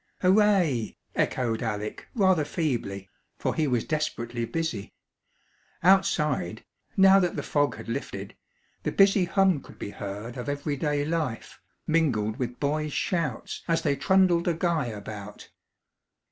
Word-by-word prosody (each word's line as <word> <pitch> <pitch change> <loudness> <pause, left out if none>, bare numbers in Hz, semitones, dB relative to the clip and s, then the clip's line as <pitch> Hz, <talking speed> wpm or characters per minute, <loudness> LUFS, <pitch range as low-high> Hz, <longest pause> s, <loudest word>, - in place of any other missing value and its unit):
"Hooray!" 185 - +3 0.2
echoed 115 -3 0
Alec 105 -2 -4
rather 190 -7 +4
feebly, 120 - -2 0.3
for - - -1
he 155 -2 +1
was 125 -4 +1
desperately 120 -6 -2
busy. 160 -8 -3 0.9
Outside 150 - +2 0.3
now 195 0 +7
that 180 -2 0
the - - -3
fog 145 -1 +1
had - - -10
lifted 110 -5 -5 0.5
the - - -2
busy 195 -1 +5
hum 190 -4 +3
could - - -15
be 100 - -6
heard 105 +6 -6
of 125 +3 -4
everyday 145 0 -1
life, 155 -7 -3 0.3
mingled 125 -10 +1
with 125 -2 -4
boys' 150 +1 -1
shouts 165 -10 -2
as 165 -1 +1
they 145 -2 +2
trundled 175 +4 +3
a 170 - +2
guy 165 -5 0
about. 105 -1 -8
145 Hz, 130 wpm, -27 LUFS, 115-170 Hz, 0.9 s, now